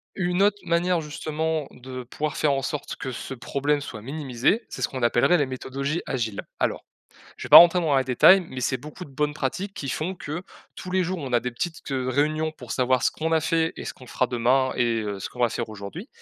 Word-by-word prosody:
Une 180 0 0
autre 205 0 +4
manière, 175 +1 +2
justement, 155 0 -3
de 130 0 -8
pouvoir 150 +5 -4
faire 150 -2 +2
en 135 - 0
sorte 145 +2 -4
que 130 - -5
ce 130 - -6
problème 145 +4 -1
soit 110 - -7
minimisé, 135 - -1
c'est - - -7
ce - - +2
qu'on 130 -2 -5
appellerait 120 +9 +4
les 145 - +2
méthodologies 140 +4 -3
agiles. 115 -6 -2 0.2
Alors, - - -1 0.5
je - - -7
vais - - -12
pas - - +13
rentrer 175 +1 +7
dans 155 -4 +1
les 130 - +1
détails, 130 +10 +6
mais 130 - -6
c'est 130 - 0
beaucoup 150 +7 -9
de 140 - -14
bonnes 150 +2 -1
pratiques 185 +9 -3
qui 140 - -5
font 170 +8 -2
que, 165 -1 -6 0.3
tous 185 - -8
les 185 0 +2
jours, 180 +1 -2
on 135 -4 -6
a 120 - +4
des 125 - -3
petites 160 +7 -4
q - - -7
heu, 130 -1 -1
réunions 155 +4 +1
pour 125 -7 -9
savoir 130 -1 +2
ce - - +3
qu'on 160 +1 -3
a 160 - +4
fait 160 +1 +1
et - - -7
ce - - -4
qu'on 130 - -15
fera 130 - 0
demain 125 +2 +2
et 115 -2 +1
heu, 100 -2 -4
ce - - -4
qu'on 125 - -11
va 120 -1 +3
faire 115 0 -3
aujourd'hui. 110 - -8
140 Hz, 245 wpm, -25 LUFS, 125-160 Hz, 0.5 s, pas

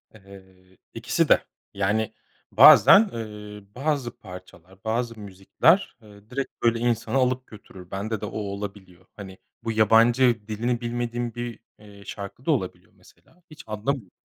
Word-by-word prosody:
Eee, 95 -2 -18 0.2
ikisi - - -1
de. - - +5 0.3
Yani, 100 +2 -1 0.4
bazen, 210 0 +8
eee, 105 -2 -8
bazı 135 -4 -2
parçalar, 90 -2 -14
bazı 115 0 -2
müzikler, 100 - +1
eee, 105 0 -18
direkt, 135 +2 -4
böyle, 115 0 +2
insanı 115 0 -1
alıp 130 0 0
götürür. 95 -4 -14
Bende 105 +2 -4
de - - -3
o - - -7
olabiliyor. 100 -3 -7
Hani, 95 -2 -10 0.3
bu 115 - -2
yabancı, 115 +1 +3
dilini 120 +3 -2
bilmediğim 120 0 -3
bir, 120 -2 -6 0.2
iii, 100 -1 -16
şarkı 100 +5 -9
da 160 - +2
olabiliyor, 95 -11 -3
mesela. 175 +1 -24
Hiç 155 -1 -13
anlamıyorum, 105 -1 -3
110 Hz, 140 wpm, -24 LUFS, 100-120 Hz, 0.4 s, bazen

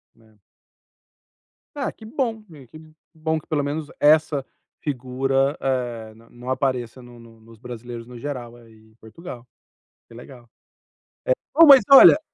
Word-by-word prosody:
Né. 110 -1 -26 1.4
Ah, - - -2
que 220 - -16
bom. 230 -3 -3 0.3
Que 155 - -12 0.3
bom, 160 0 -2
que 155 - -9
pelo 150 -2 -1
menos 145 +1 -4
essa 150 -2 +3 0.4
figura, 135 +1 -1
eh, 120 -4 -3
n 115 +1 -21
não 125 +1 -11
apareça 130 -2 -2
no 120 -1 -15
no 115 -1 -18
nos 115 0 -18
brasileiros, 120 -1 -9
no 125 -1 -11
geral, 120 -3 -7
aí 115 -2 -18 0.2
em - - -29
Portugal. 120 +2 -12 0.6
Que - - -17
legal. 120 0 -14 1.1
Eh, - - -5
bom, 330 - +11
mas, 275 -3 +9
olha, 275 +2 +9
130 Hz, 145 wpm, -22 LUFS, 120-150 Hz, 1.4 s, bom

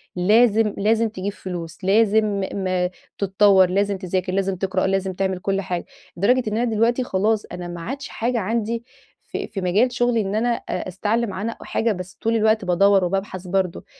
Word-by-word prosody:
لازم 215 +3 +4
لازم 220 +2 +2
تجيب 200 -1 -4
فلوس، 175 -2 -7
لازم 210 0 +3
م 185 -2 0 0.3
تتطّور، 195 -1 +4
لازم 200 +1 +1
تذاكر، 185 -1 -2
لازم 195 0 0
تقرأ، 190 0 -1
لازم 190 0 0
تعمل 190 0 -1
كل 195 +1 -1
حاجة. 180 -2 -4 0.3
لدرجة 245 +7 +3
إن 215 - -2
أنا 240 - +1
دلوقتي 235 +4 +2
خلاص 215 0 0
أنا 175 0 -6
ما 175 -1 -7
عادش 270 +9 -5
حاجة 235 +1 -1
عندي 225 +2 -2 0.4
في - - -5
في 195 - -5
مجال 200 +8 +2
شغلي 240 -1 +2
إن 195 0 -2
أنا 230 +3 +1
أ 235 -4 -3
أستعلم 210 +3 -1
عنها 215 +5 -3
أو - - -10
حاجة، 230 0 0
بس 185 -1 -6
طول 225 +1 +1
الوقت 220 -2 +2
بادوّر 195 +2 +4
وبابحث 185 0 -3
برضه. 185 -1 -1
200 Hz, 180 wpm, -22 LUFS, 185-225 Hz, 0.4 s, لازم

